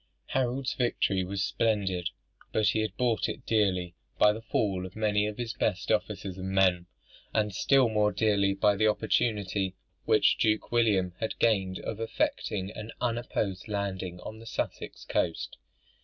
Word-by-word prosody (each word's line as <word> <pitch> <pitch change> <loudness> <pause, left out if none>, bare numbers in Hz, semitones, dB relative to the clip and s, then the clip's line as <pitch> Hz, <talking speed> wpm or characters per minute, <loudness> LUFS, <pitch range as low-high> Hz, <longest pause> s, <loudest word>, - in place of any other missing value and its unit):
Harold's 130 0 0
victory 100 -6 +1
was 95 +1 -2
splendid; 95 -5 0 0.4
but 110 -1 +3
he 110 - +1
had 110 -2 -2
bought 120 -5 +1
it - - -6
dearly 95 -5 +1 0.2
by 105 - +6
the 110 - -7
fall 100 -4 0
of 95 - -8
many 105 -1 +1
of 105 - -5
his 120 -1 -3
best 100 -6 -1
officers 105 -3 -1
and 95 +1 -4
men; 90 -2 +3 0.5
and 105 -2 +1
still 135 +5 +4
more 105 -1 +2
dearly 100 -1 +2
by 100 +1 +3
the 110 +2 +3
opportunity 105 -3 0 0.3
which - - +4
Duke 110 -1 +1
William 105 -7 +2
had 110 - -3
gained 95 -5 +2
of 110 - -5
effecting 105 -3 -1
an 110 +1 -7
unopposed 115 -6 -2
landing 95 -4 -3
on 110 0 -8
the 115 - -12
Sussex - - -4
coast. 85 -2 -1
105 Hz, 155 wpm, -29 LUFS, 95-110 Hz, 0.5 s, by